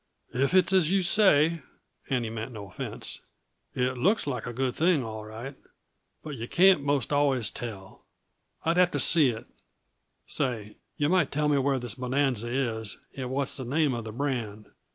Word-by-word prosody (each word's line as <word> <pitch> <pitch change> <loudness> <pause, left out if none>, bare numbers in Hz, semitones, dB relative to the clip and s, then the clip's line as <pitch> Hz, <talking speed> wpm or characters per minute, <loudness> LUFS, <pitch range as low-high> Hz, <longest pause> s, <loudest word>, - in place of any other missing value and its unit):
"If 140 +8 +1
it's 185 +1 +4
as 180 -5 +4
you 195 -1 +2
say" 170 -5 +4 0.5
and 125 -3 0
he 110 - -4
meant 115 +2 -5
no 105 -2 -8
offense 90 - -6 0.5
"it 125 0 -1
looks 200 - +2
like 140 -4 -3
a - - -3
good 125 +1 -1
thing, 165 -2 +2
all 110 -1 -6
right. 115 +6 -8 0.7
But 150 -3 -6
yuh 115 +1 -5
can't 185 0 +5
most 140 -2 0
always 135 -6 +2
tell. 100 -5 -8 0.6
I'd 165 +2 +2
have 180 -1 +5
to - - -2
see 155 -6 +5
it 115 -1 -5 0.8
say, 110 -5 -3 0.2
yuh 145 - +1
might 185 0 +2
tell 150 +1 0
me 145 -1 +3
where 135 0 +1
this 120 -3 -4
bonanza 125 -2 -1
is, 115 -5 -1 0.2
and 130 -2 -4
what's 135 +1 0
the 130 - -5
name 140 +2 +1
uh 120 - -3
the 110 -1 -7
brand. 115 -5 -4
130 Hz, 180 wpm, -27 LUFS, 115-150 Hz, 0.8 s, can't